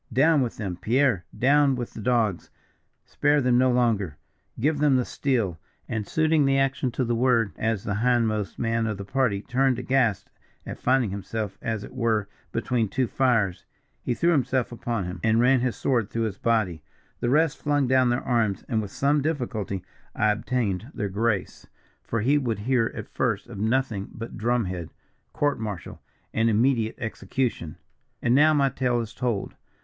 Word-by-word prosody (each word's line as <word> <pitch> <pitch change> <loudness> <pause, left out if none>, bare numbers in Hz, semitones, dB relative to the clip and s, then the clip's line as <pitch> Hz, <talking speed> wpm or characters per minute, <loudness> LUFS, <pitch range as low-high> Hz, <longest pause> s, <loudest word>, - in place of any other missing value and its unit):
Down 145 +5 +4
with 120 -3 -2
them, 95 -5 -4
Pierre; 120 -4 +1
down 140 +1 +4
with 120 -2 -5
the - - -7
dogs! 110 -5 0 0.6
Spare 145 0 +2
them 125 -2 +3
no 130 0 +4
longer! 110 - +1 0.4
Give 145 +4 +1
them 145 -2 +4
the 125 -1 +2
steel,' 115 - -1 0.3
and 110 -2 -3
suiting 160 -1 +2
the 135 0 +3
action 135 -1 +1
to 130 - 0
the 120 - 0
word, 115 -3 +2
as 110 -3 -1
the 100 -1 -2
hindmost 110 -3 +1
man 115 -1 0
of 105 -2 -2
the 100 - -7
party, 110 -3 0
turned 130 0 +1
aghast 115 -7 0 0.3
at - - -7
finding 125 -5 +2
himself 100 +1 -4
as 110 -2 -3
it - - -10
were 115 -5 0 0.2
between 115 -2 0
two 130 +4 0
fires, 115 -7 +1 0.4
he 120 - -1
threw 170 +6 +2
himself 130 -5 +1
upon 120 -3 -3
him, 90 +1 -6
and 110 0 +3
ran 130 +2 +4
his 125 -1 -1
sword 120 -6 0
through 115 - -2
his 105 -3 -3
body. 110 -9 0 0.4
The 120 - 0
rest 155 +2 +2
flung 145 -2 +1
down 130 -1 +4
their 120 +1 0
arms, 115 -5 0
and 110 -3 0
with 105 - -6
some 140 +7 +1
difficulty 115 - -2 0.3
I 110 - +3
obtained 105 -1 -2
their 105 - -2
grace, 105 0 -2 0.3
for 115 - -2
he 140 +6 +3
would 120 -6 -1
hear 120 0 +1
at - - -6
first - - -1
of - - -9
nothing 110 -2 0
but 115 +1 -8
drum 120 0 0
head, 90 -3 -5 0.4
court 145 -4 0
martial, 105 -6 -6 0.3
and 115 +1 +2
immediate 115 0 +2
execution. 110 - -3 0.4
"And 120 - +1
now, 150 +4 +6
my 140 -2 +3
tale 125 -2 0
is 115 0 -5
told. 120 -6 -2
120 Hz, 180 wpm, -25 LUFS, 105-130 Hz, 0.6 s, now